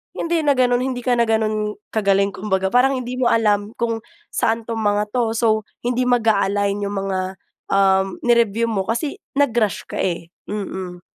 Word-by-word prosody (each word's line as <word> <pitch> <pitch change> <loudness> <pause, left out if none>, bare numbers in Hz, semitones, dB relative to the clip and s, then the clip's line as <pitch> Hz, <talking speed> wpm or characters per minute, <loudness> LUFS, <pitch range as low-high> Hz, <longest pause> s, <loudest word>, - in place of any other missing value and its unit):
hindi 335 0 0
na 285 - +5
gano’n, 245 -1 +3
hindi 255 -1 -2
ka 245 -2 +2
na 235 - +4
gano’n 215 -1 0 0.2
kagaling 200 -2 +2
kumbaga, 190 -1 -1
parang 265 +2 +4
hindi 255 0 -4
mo 250 - +3
alam 210 -2 +2
kung 230 -1 -1 0.3
saan 225 +1 0
‘tong 225 0 -4
mga 210 0 0
‘to, 230 -2 0
so 220 -2 +1 0.2
hindi 250 +1 0
mag-a-align 205 -4 +2
‘yong 200 - -3
mga, 190 -1 -1 0.5
um, 195 -1 +3
ni-review 230 -1 +2
mo 195 -3 -1
kasi 280 +6 -2 0.2
nag-rush 240 -7 +1
ka, - - -4
eh, 170 -2 -2 0.2
mm. 190 -3 -5
220 Hz, 165 wpm, -21 LUFS, 200-240 Hz, 0.5 s, na